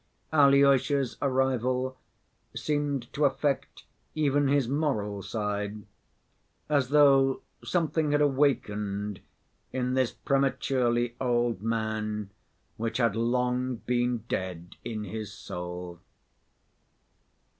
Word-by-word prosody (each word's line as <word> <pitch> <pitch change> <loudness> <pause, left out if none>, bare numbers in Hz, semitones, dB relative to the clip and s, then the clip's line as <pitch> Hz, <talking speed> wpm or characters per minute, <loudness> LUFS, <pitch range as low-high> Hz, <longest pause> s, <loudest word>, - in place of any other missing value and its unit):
Alyosha's 140 -2 +4
arrival 130 -1 +1 0.6
seemed 145 -5 -2
to 150 - 0
affect 140 0 -1 0.3
even 145 -2 +2
his 140 -3 +2
moral 115 -8 -1
side, 105 0 -3 0.8
as 140 -4 +1
though 135 -2 +5 0.2
something 160 -3 0
had 145 - +3
awakened 105 -8 0 0.5
in 125 -1 -1
this 130 -2 +2
prematurely 125 -3 0
old 120 -5 +1
man 110 -2 -2 0.5
which 115 0 -2
had 115 -4 +2
long 125 +2 0
been 120 -1 -1
dead 90 -4 -4
in 110 -3 -4
his 105 +1 -5
soul. 90 -2 -7
125 Hz, 90 wpm, -28 LUFS, 110-140 Hz, 0.8 s, though